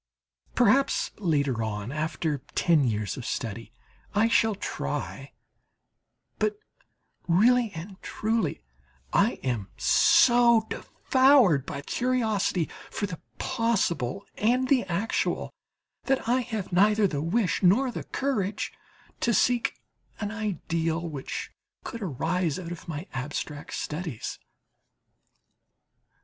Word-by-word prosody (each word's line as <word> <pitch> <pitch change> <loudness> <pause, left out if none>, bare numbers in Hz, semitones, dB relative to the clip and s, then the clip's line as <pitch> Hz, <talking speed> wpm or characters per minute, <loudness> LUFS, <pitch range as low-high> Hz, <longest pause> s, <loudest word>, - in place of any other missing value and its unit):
Perhaps 275 - +3
later 140 - +1
on, 105 +1 -3
after 155 0 -2 0.2
ten 165 -4 +4
years 105 -3 -2
of 130 - -6
study, 115 -2 -4 0.4
I 220 +2 +4
shall 225 -2 +3
try; 195 - -4 1.1
but 425 -1 +1 0.7
really 230 +6 +4
and 185 +4 -8
truly, 215 - -1 0.5
I 210 +4 +4
am 120 -7 -1
so 235 -2 +5
devoured 260 - +3
by 140 0 -5
curiosity 220 - 0 0.2
for - - -2
the 180 -5 -6 0.2
possible 200 - 0
and 250 +4 +2
the 260 -7 +3
actual, 190 +5 -1 0.5
that 270 -3 0
I 245 +2 +3
have 220 -7 -5
neither 210 +3 +4
the 145 -7 -1
wish 180 +5 0
nor 225 +8 +4
the - - -6
courage 215 -8 -2 0.5
to 235 -2 +2
seek 245 +3 +2 0.4
an 205 -1 -3
ideal 170 -6 -2
which 145 -5 -5 0.3
could 230 - -6
arise 165 - -1
out 175 -2 -6
of 175 - -8
my 160 +1 -5
abstract 145 +2 -4
studies. 155 - -4
190 Hz, 110 wpm, -27 LUFS, 155-230 Hz, 1.1 s, so